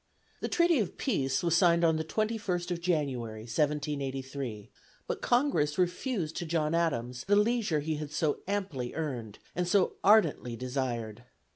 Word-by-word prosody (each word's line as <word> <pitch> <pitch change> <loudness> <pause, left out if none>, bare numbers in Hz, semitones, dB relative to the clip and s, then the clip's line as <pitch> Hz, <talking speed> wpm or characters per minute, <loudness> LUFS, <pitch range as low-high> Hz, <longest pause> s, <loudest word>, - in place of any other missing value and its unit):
The - - -3
treaty 340 -4 +3
of 205 - -2
peace 135 - 0
was 170 -1 +3
signed 170 -1 +4
on 160 -1 +3
the 160 - -1
21st 195 -1 -1
of 170 -1 -2
January, 135 -10 -1
1783; 135 -3 -2 0.3
but - - -4
Congress 240 - +2
refused 180 - -1
to 175 - -3
John 155 -1 0
Adams 125 -7 0
the 205 - +4
leisure 210 -7 +2
he 155 +1 -2
had 150 -1 -5
so 155 -1 0
amply 185 -12 -2
earned, 125 -10 -4 0.2
and 180 0 0
so 195 0 +2
ardently 170 - +4
desired. 120 -3 -3
155 Hz, 150 wpm, -30 LUFS, 130-180 Hz, 0.3 s, signed